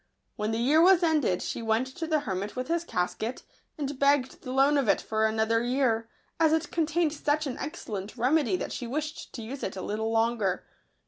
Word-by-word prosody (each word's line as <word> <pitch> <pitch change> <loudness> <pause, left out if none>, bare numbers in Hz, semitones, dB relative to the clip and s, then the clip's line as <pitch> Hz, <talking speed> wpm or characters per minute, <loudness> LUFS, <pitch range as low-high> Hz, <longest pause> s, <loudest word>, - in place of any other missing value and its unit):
When 210 0 -2
the 225 - -1
year 280 +7 +4
was 365 0 +6
ended, 300 - +2
she - - -4
went 225 +2 +1
to 265 +5 -6
the 310 -2 +1
hermit 200 -3 -4
with 255 +3 -4
his 335 0 +1
casket, 220 - -3 0.3
and 285 -2 -4
begged 280 -2 +2
the 255 - -6
loan 270 +3 +4
of 265 - 0
it - - +4
for 220 0 0
another 220 +1 +1
year, 240 -2 +1 0.3
as 320 -1 +4
it 320 +1 0
contained 325 -1 +1
such 300 0 0
an 265 -3 -4
excellent 220 - -6
remedy 250 -3 +2
that - - -4
she 245 - -4
wished 305 +5 -4
to 235 - -6
use 260 +5 -7
it 190 - -3
a 190 - -5
little 220 +2 -2
longer. 225 -4 +1
255 Hz, 205 wpm, -28 LUFS, 220-300 Hz, 0.3 s, was